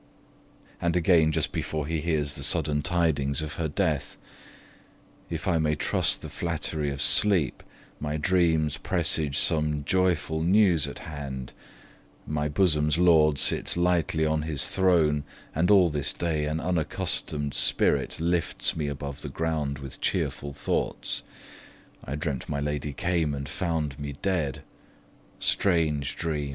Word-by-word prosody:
And 85 0 0
again, 85 -2 +4
just - - -1
before 75 -2 -3
he 80 +1 -2
hears 75 -3 0
the 70 - -6
sudden 75 0 +1
tidings 75 -3 0
of 75 - -6
her 80 - 0
death: 75 -3 -1 1.1
If 85 +4 -4
I 85 -3 +2
may 75 -1 +1
trust - - +1
the - - -5
flattery 80 -3 -3
of 70 0 -5
sleep, 90 -9 +2 0.4
My 75 0 -2
dreams 80 -3 +2
presage 80 -4 +1
some 75 -3 +2
joyful 85 -1 0
news 90 -2 +4
at - - -9
hand; 70 -5 -6 0.7
My 75 0 -2
bosom's 75 -2 +2
lord 80 -4 +5
sits - - +4
lightly 85 -2 +1
on 80 0 +1
his 75 -3 -2
throne, 80 -6 +2 0.3
And 80 +4 +1
all 95 -5 +6
this 75 -2 0
day 80 -3 -1
an 75 +2 -2
unaccustom'd 80 -4 -1
spirit - - +2
Lifts 85 +1 0
me 75 -2 -2
above 70 -1 -5
the - - -6
ground 80 -4 -2
with 70 -1 -9
cheerful 70 - -2
thoughts. 75 +1 -2 0.8
I 70 - -5
dreamt 75 -3 -4
my 70 -2 -2
lady 75 0 -2
came 80 0 -1
and 70 0 -5
found 75 -3 -2
me 70 -1 -5
dead, 75 -8 -1 0.7
(Strange 80 -7 +1
dream! 75 -4 -2
75 Hz, 140 wpm, -26 LUFS, 75-85 Hz, 1.1 s, all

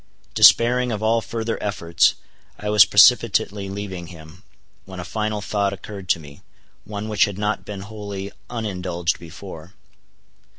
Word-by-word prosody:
Despairing 125 +1 +5
of 110 -1 -3
all 115 +1 +2
further 115 0 -4
efforts, 85 -5 +1 0.4
I 105 0 -3
was 105 0 +8
precipitately 105 -3 +4
leaving 95 -3 -6
him, 80 0 -13 0.4
when 95 -1 -10
a 90 - -6
final 105 -1 -3
thought 100 0 -1
occurred 100 -1 -9
to - - +3
me—one 100 +7 -11
which 105 -1 +3
had 100 -2 -6
not 105 +1 -2
been 100 -2 -7
wholly 100 -1 -7 0.2
unindulged 90 -7 -2
before. 85 +1 -11
100 Hz, 135 wpm, -22 LUFS, 90-110 Hz, 0.4 s, was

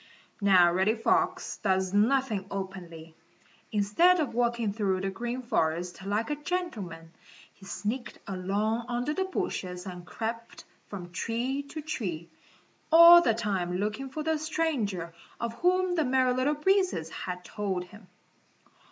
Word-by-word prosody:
Now 180 -4 +6
Reddy 190 +5 +2
Fox 370 +9 0
does 190 0 0
nothing 220 -2 +2
openly. 180 -5 -7 0.6
Instead 220 - +4
of 280 -7 -1
walking 235 -3 0
through 195 -3 0
the 195 0 -2
Green 240 +5 -4
Forest 175 -3 -1
like 210 +7 -1
a - - 0
gentleman, 220 - -4 0.4
he 195 - -15
sneaked 235 +6 -4
along 205 +5 -1
under 245 +4 -1
the 380 +3 -1
bushes 185 - -4
and 180 -2 -7
crept 230 +4 -6 0.2
from 175 -4 -8
tree 235 +9 -2
to 310 +1 -6
tree, 180 - -4 0.6
all 335 +1 +10
the 230 -9 +2
time 190 -5 -1
looking 215 +7 -3
for 305 +4 -5
the 320 0 0
stranger 240 - -2 0.3
of 235 -1 -3
whom 365 0 +2
the 325 -3 +2
Merry 255 -1 +2
Little 260 +4 +1
Breezes 360 - +1
had 180 -1 -6
told 195 -4 -3
him. 205 +2 -15
220 Hz, 140 wpm, -28 LUFS, 190-285 Hz, 0.6 s, all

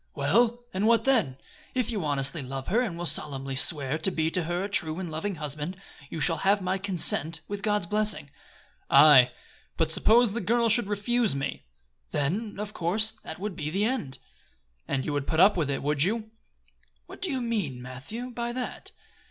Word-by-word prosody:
"Well, 230 +12 +2
and 195 +3 0
what 230 0 +4
then? 225 - +2 0.4
If 245 -2 0
you 205 -6 -3
honestly 145 +1 0
love 135 0 -6
her, 225 +5 +2
and 200 -9 -3
will 175 - -4
solemnly 135 -4 -2
swear 140 +2 +3
to 190 - +4
be 160 -3 -1
to 180 -1 -1
her 175 +2 -2
a - - -2
true 160 -5 0
and 175 -4 -5
loving 180 +6 -3
husband, 150 +3 -4 0.3
you 160 - -5
shall 165 +2 +2
have 200 +5 +2
my 185 0 -2
consent, 165 -4 +1
with 205 0 -5
God's 210 -3 0
blessing." 210 -6 0 0.6
"Aye, 140 -3 +8 0.5
but - - +2
suppose 235 0 +4
the 235 +3 -3
girl 230 +4 +2
should 220 -1 +3
refuse 210 - 0
me?" 135 0 -4 0.4
"Then, 195 - -2
of 210 +1 -5
course, 210 +6 +1
that 160 - -7
would 200 0 -5
be 150 -1 -4
the 195 +6 0
end." 220 - -2 0.7
"And 135 -1 -2
you 150 - -2
would 145 -1 -2
put 160 - 0
up 195 +3 +6
with 160 -6 -1
it, 140 - -2
would 145 0 0
you?" 220 +5 0 0.7
"What - - -13
do 375 - 0
you 265 -4 -1
mean, 210 - -2
Matthew, 140 - -8
by 235 0 -4
that?" 250 0 -6
185 Hz, 195 wpm, -27 LUFS, 150-220 Hz, 0.7 s, Aye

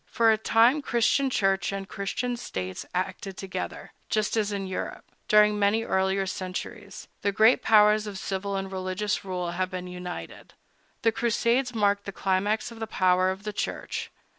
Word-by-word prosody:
For 230 -1 +3
a 220 - +3
time 235 +6 +4
Christian 265 +2 +2
Church 195 -6 +1
and 195 -1 -4
Christian 240 +6 -3
States 95 - -5
acted 185 +1 -3
together, 185 -1 -6 0.2
just 215 0 0
as 210 -2 +1
in 200 -1 -3
Egypt, 185 -1 -5 0.2
during 210 0 +5
many 205 +3 +2
earlier 190 -1 +1
centuries, 190 +2 -6
the 200 - +1
great 220 +4 +5
powers 210 0 +5
of 200 -2 -6
civil 195 +1 -3
and 195 0 -3
religious 190 +2 -2
rule 180 -2 -3
had 185 +1 -1
been 185 -1 -5
united. 180 0 -8 0.5
The 225 - +4
Crusades 235 +2 +1
marked 205 -2 +2
the 200 - -4
climax 200 +4 0
of 230 - -11
the 225 - -3
power 185 -1 +3
of 190 +2 -4
the 210 0 -4
Church. - - -4
200 Hz, 165 wpm, -27 LUFS, 185-220 Hz, 0.5 s, during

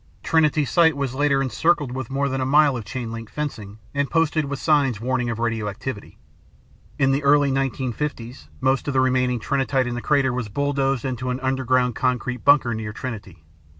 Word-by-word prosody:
Trinity 155 -2 +2
Site 160 0 +3
was 135 -3 -2
later 140 0 +2
encircled 145 +3 +1
with 130 -2 -5
more 140 +1 0
than 135 -1 -2
a - - +1
mile 145 0 +4
of 115 -3 -5
chain 115 +2 -5
link 115 -1 -7
fencing 110 -9 -5 0.2
and 140 0 -1
posted 165 -2 +1
with 140 0 -4
signs 140 -7 +2
warning 125 +1 -1
of 115 - -3
radioactivity. 115 0 -4 0.8
In 135 -2 +3
the 135 +2 +1
early 145 0 +4
1950s 130 - -3
most 135 +1 +1
of 140 - -2
the - - +4
remaining 125 -1 +1
Trinitite 135 +1 0
in 125 - -3
the 120 - -4
crater 140 -3 +2
was 125 -4 -3
bulldozed 135 0 -1
into 130 -1 -3
a 125 - -1
underground 130 -1 +1
concrete 125 0 -2
bunker 140 -4 +4
near 110 -1 -5
Trinity. 105 - -7
130 Hz, 185 wpm, -23 LUFS, 120-140 Hz, 0.8 s, mile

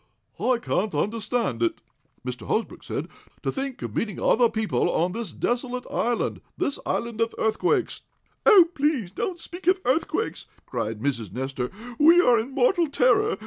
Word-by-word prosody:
"I 255 -1 +2
can't 215 -3 -1
understand 215 - -1
it," 115 - +1 0.5
Mr. 125 -3 -5
Hosbrook 225 - -2
said. - - -4 0.4
"To - - 0
think 270 -2 -4
of - - -5
meeting 215 -4 -2
other 240 -2 +4
people 220 -1 0
on 175 +2 +1
this 220 -3 -4
desolate 245 +4 -2
island 240 0 -1 0.2
this 280 - -1
island 230 -1 -2
of 230 0 0
earthquakes." 350 - 0 0.4
"Oh, 390 -7 +8
please 285 - 0
don't 345 - -3
speak 345 +1 -8
of 370 +1 +5
earthquakes!" 320 - 0 0.2
cried 115 -3 -3
Mrs. 120 -8 -2
Nestor. 130 +2 -3 0.3
"We 330 +4 +7
are 245 -9 +5
in 225 +4 -3
mortal 275 +6 +2
terror! 255 -4 +3
235 Hz, 155 wpm, -25 LUFS, 185-285 Hz, 0.5 s, Oh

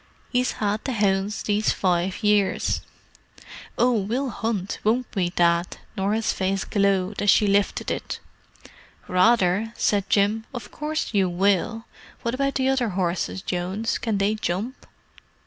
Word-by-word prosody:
He's 250 0 +1
'ad 210 0 0
the 265 - -1
'ounds 200 -1 0
these 210 +1 +1
five 185 +2 0
years." 210 -2 +2 1.0
"Oh, 250 +1 +4
we'll 235 +5 -1
hunt, 210 -3 -3
won't 235 +4 +2
we, 180 -3 +1
Dad?" 170 0 +1 0.2
Norah's 210 +2 0
face 190 0 -1
glowed 200 -1 +1
as 205 - +2
she 210 - +5
lifted 200 0 +1
it. - - -4 0.9
"Rather!" 195 +2 +3
said 200 -2 +1
Jim. 215 +2 +2
"Of 215 -4 -7
course 305 -4 -3
you 195 -3 +3
will. 200 +5 +1 0.4
What 235 - -1
about 275 +1 0
the 265 -1 +1
other 265 -4 +1
horses, 180 +1 -1
Jones? 190 +5 -2
Can 225 -3 -1
they 200 +2 +2
jump?" 215 +4 -3
205 Hz, 140 wpm, -24 LUFS, 190-225 Hz, 1.0 s, she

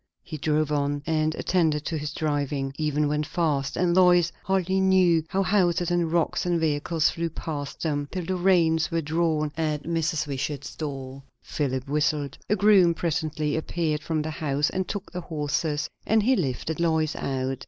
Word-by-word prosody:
He 155 - -7
drove 155 0 0
on, 145 0 0
and 155 0 0
attended 160 -5 +1
to 165 - -2
his 150 0 -4
driving, 145 -3 -2
even 150 -1 0
went 150 0 -1
fast; 140 -5 -1
and 175 -1 +2
Lois 175 -2 +5
hardly 190 0 +1
knew 185 -4 +4
how 195 +4 0
houses 180 -2 +2
and 170 -2 +1
rocks 170 -1 +1
and 175 -1 +1
vehicles 155 +1 +1
flew 170 0 -2
past 145 -3 -6
them, 145 -3 -1
till 180 -2 -4
the 185 - -1
reins 170 -3 +3
were 165 -1 0
drawn 155 -1 0
at 155 -2 -1
Mrs. 160 -2 -1
Wishart's 140 0 -4
door. 135 -3 -6 0.2
Philip 130 -3 -2
whistled; 145 -1 -1
a 210 - +3
groom 195 -4 +5
presently 155 -2 -1
appeared 160 -1 -1
from 155 0 -1
the 155 - -4
house 145 -1 0
and 185 0 -2
took 205 -1 -5
the 180 - -5
horses, 150 -1 -2 0.2
and 220 -1 +3
he 260 +4 +4
lifted 155 - -2
Lois 160 -2 +1
out. 130 -1 -2
155 Hz, 175 wpm, -25 LUFS, 145-170 Hz, 0.2 s, Lois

